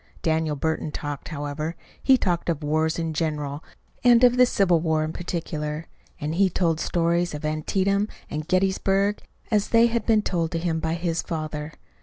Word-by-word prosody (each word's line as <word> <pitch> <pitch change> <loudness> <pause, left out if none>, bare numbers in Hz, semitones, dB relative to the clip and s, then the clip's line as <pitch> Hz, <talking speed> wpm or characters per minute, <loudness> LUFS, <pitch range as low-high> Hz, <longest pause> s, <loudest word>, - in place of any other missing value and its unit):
Daniel 160 -2 +1
Burton 160 +1 -2
talked, 145 -1 -5
however. 150 +1 -4 0.3
He 265 -1 +5
talked 175 -6 -1
of 160 -2 -1
wars 155 +2 +1
in 165 -1 -2
general 150 -2 -2 0.4
and 240 0 +6
of 245 0 +6
the 250 0 +6
Civil 180 -7 +3
War 160 -1 +1
in 155 +1 -3
particular; 160 -3 -4 0.3
and 150 0 -2
he 190 +3 +3
told 165 -3 0
the - - -1
stories 170 -1 +1
of 150 - -6
Antietam 195 +6 0 0.2
and 155 +1 -5
Gettysburg 195 +2 +1 0.3
as 210 -2 +2
they 230 0 +6
had 235 -2 0
been 220 -2 +4
told 170 -5 0
to - - 0
him 165 -1 -1
by 160 +1 -1
his 170 -1 -1
father. 155 -2 -4
165 Hz, 180 wpm, -25 LUFS, 155-190 Hz, 0.4 s, and